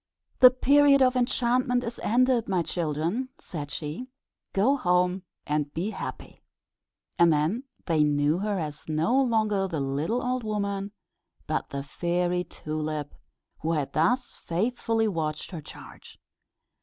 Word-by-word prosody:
"The 255 - +10
period 275 +2 +5
of 255 0 +3
enchantment 250 0 +1
is 235 0 -5
ended, 245 0 +2
my 185 -3 +1
children," 170 - -2
said 145 -4 -6
she. 155 - -5 0.4
"Go 225 +9 +3
home 180 -4 +1 0.2
and 150 -1 -1
be 185 +7 -1
happy." - - -7 0.8
And 170 -1 +6
then 160 - 0 0.2
they 160 -3 +3
knew 145 +2 +2
her 205 0 -1
as 150 -2 -5
no 165 +13 +2
longer 215 -6 +1
the 165 -5 -3
little 145 - -1
old 255 0 -1
woman, 200 -2 -2 0.5
but - - -2
the 140 0 -4
Fairy 175 +4 -1
Tulip, 155 -3 -4 0.5
who 165 +2 -1
had 150 -4 -2
thus 240 +11 +1
faithfully 225 +4 0
watched 155 -5 -3
her 170 -4 -6
charge. - - -13
185 Hz, 135 wpm, -27 LUFS, 155-240 Hz, 0.8 s, The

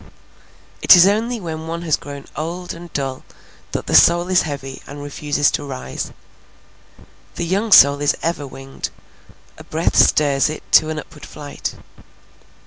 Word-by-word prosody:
It - - +8
is 175 0 +7
only 225 +4 0
when 160 -3 -6
one 170 +1 -5
has 160 -3 +2
grown 140 -1 -9
old 170 +4 -5
and 170 0 -11
dull 135 -2 -4 0.5
that - - -4
the - - -4
soul 175 +1 +5
is 185 -1 +4
heavy 135 -3 -6
and 145 +1 -9
refuses 145 0 0
to - - -3
rise. 130 - -6 1.2
The 170 - -3
young 200 +6 -1
soul 140 -4 +7
is 145 - +1
ever 160 -4 -2
winged; 135 0 -7 0.7
a - - -10
breath - - -2
stirs 140 -1 +3
it 155 - -7
to 155 - +5
an 155 - -4
upward 150 0 -10
flight. 145 -1 -7
155 Hz, 155 wpm, -19 LUFS, 140-170 Hz, 1.2 s, It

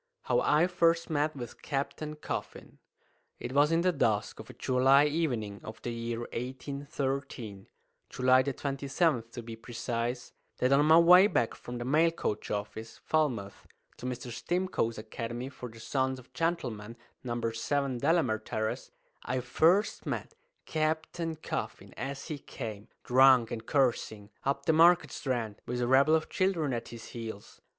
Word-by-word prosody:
HOW - - +2
I 155 +3 +4
FIRST 165 -2 +2
MET 150 0 +1
WITH 120 -4 -8
CAPTAIN 150 +2 -3
COFFIN. 150 - -6 0.6
It - - -5
was 145 +2 +4
in 165 +1 +3
the 180 +1 +3
dusk 110 -9 0
of 110 - -10
a - - -9
July 135 +2 +4
evening 125 -10 -1
of 110 - -8
the 120 - -3
year 115 0 -3
1813 130 -4 -4 0.4
(July 130 0 +4
27, 140 +1 0
to 120 - -7
be 115 0 -7
precise) 120 +1 -4 0.2
that 125 +2 +2
on 145 +2 +4
my 160 +1 +8
way 180 +3 +8
back 120 - +1
from 120 0 -8
the 120 - -4
mail 155 +6 +4
coach 110 -10 -3
office, 110 +2 -5
Falmouth, 125 -11 -1 0.3
to 125 - -6
Mr. 125 -1 -5
Stimcoe's 175 -4 -1
Academy 115 +3 -5
for 125 -2 -8
the 115 0 -14
Sons 130 +2 -1
of 130 0 -16
Gentlemen, 125 -8 -2 0.3
No. 120 -2 -3
7, 135 +2 -1
Delamere 130 -8 +2
Terrace, 110 0 -3 0.3
I 130 - -1
first 180 - +2
met - - -3 0.3
Captain 160 +1 -1
Coffin 155 - -5
as 135 +3 -5
he 155 -3 -4
came, 110 -5 -7 0.2
drunk 130 -2 +5
and 115 -1 -5
cursing, 115 -6 0
up 140 +1 0
the 160 - +4
Market 170 +2 +5
Strand, 120 -8 -3
with 125 0 -2
a 120 - +1
rabble 135 +5 +5
of 160 - 0
children 170 -7 0
at 115 -1 -3
his 115 -1 -10
heels. 110 -3 -8
130 Hz, 155 wpm, -30 LUFS, 115-155 Hz, 0.6 s, my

